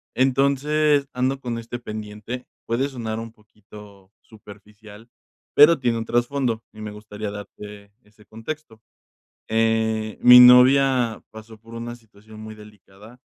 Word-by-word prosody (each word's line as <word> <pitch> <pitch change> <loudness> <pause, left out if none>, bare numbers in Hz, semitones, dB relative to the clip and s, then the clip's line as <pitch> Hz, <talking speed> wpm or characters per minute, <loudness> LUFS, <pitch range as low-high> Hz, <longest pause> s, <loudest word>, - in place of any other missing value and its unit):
Entonces, 140 +2 +1
ando 130 +2 -2
con 120 -2 -5
este 115 +1 -7
pendiente, 110 +2 -8 0.2
puede 120 +4 -1
sonar 115 -5 -6
un 115 0 -9
poquito 105 -3 -17
superficial, 105 +1 -16 0.4
pero 150 +1 +6
tiene 120 -2 -1
un 115 - -5
trasfondo 120 -1 -1
y 110 - -16
me 105 -1 -7
gustaría 105 0 -8
darte 105 0 -11
ese 105 0 -24
contexto. 115 +2 -9 0.7
Eh, 110 -1 -1
mi 125 0 +9
novia 125 -1 +5
pasó 110 +1 -13
por 115 +2 -16
una 120 +1 -7
situación 110 -2 -17
muy 110 0 -10
delicada, 105 +2 -17
115 Hz, 130 wpm, -22 LUFS, 105-125 Hz, 0.7 s, mi